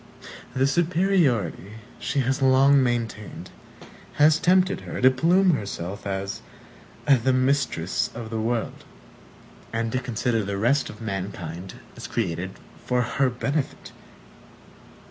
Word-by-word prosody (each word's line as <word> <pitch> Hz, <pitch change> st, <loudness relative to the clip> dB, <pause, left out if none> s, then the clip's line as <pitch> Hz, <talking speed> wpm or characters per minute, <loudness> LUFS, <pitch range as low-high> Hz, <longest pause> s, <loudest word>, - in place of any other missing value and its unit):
The 130 Hz, +1 st, +3 dB
superiority 150 Hz, -, +1 dB, 0.3 s
she 140 Hz, -, -1 dB
has 135 Hz, +2 st, -1 dB
long 135 Hz, +1 st, +5 dB
maintained 115 Hz, -4 st, -3 dB, 0.6 s
has 155 Hz, +1 st, +4 dB
tempted 185 Hz, +1 st, +3 dB
her -, -, -6 dB
to 130 Hz, +1 st, +6 dB
plume 180 Hz, +8 st, +3 dB
herself 100 Hz, -, -4 dB
as 95 Hz, 0 st, -3 dB, 0.7 s
the 130 Hz, -2 st, +4 dB
Mistress 130 Hz, -5 st, 0 dB
of 115 Hz, -1 st, -7 dB
the 110 Hz, -, -2 dB
World, 115 Hz, 0 st, -2 dB, 0.9 s
and 115 Hz, 0 st, -2 dB
to 125 Hz, -, 0 dB
consider 120 Hz, -2 st, -1 dB
the 100 Hz, 0 st, -3 dB
rest 120 Hz, +8 st, +2 dB
of 105 Hz, -, -11 dB
mankind 95 Hz, -4 st, -5 dB, 0.2 s
as -, -, -8 dB
created 90 Hz, -4 st, -2 dB, 0.3 s
for 125 Hz, 0 st, +1 dB
her 130 Hz, +3 st, +1 dB
benefit. 135 Hz, +3 st, -3 dB
120 Hz, 120 wpm, -24 LUFS, 105-140 Hz, 0.9 s, to